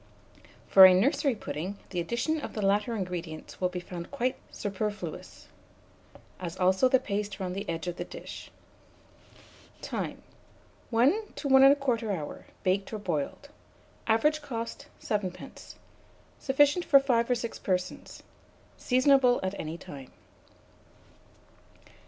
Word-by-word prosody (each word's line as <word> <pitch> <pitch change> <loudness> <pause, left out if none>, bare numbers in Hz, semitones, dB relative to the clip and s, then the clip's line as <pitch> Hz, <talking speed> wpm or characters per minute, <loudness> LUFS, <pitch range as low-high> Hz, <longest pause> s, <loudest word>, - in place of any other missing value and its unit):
For 190 -1 +10
a 185 - +5
nursery 270 - +2
pudding, 195 -1 -5
the 180 - -2
addition 240 - -1
of - - -6
the 215 - -3
latter 205 +4 +1
ingredients 175 -6 -6
will 180 - +2
be 180 0 -5
found 175 -1 -8
quite 255 -2 -1
superfluous, 205 -4 -5 0.9
as 175 -1 -6
also 190 +6 +3
the 260 - +5
paste 205 -4 -3
round 185 -1 -3
the 200 +2 -5
edge 165 0 -3
of 175 0 -4
the - - -3
dish. - - -9 1.3
Time. - - -5 0.7
1 285 - +2
to 285 - -4
1 265 -1 +6
1/4 245 -6 -1
hour, 150 -2 -8 0.2
baked 195 +1 0
or 220 - -3
boiled. 180 - -3 0.6
Average 300 +8 +2
cost, 230 -5 -6
7d. 200 -4 -5 0.6
Sufficient 290 +5 +3
for 275 - +6
5 245 -4 +1
or 250 - +3
6 235 -1 -5
persons. 185 -1 -3 0.5
Seasonable 255 -1 +4
at 190 0 -1
any 160 +1 -5
time. 135 -6 -11
210 Hz, 130 wpm, -28 LUFS, 180-255 Hz, 1.3 s, For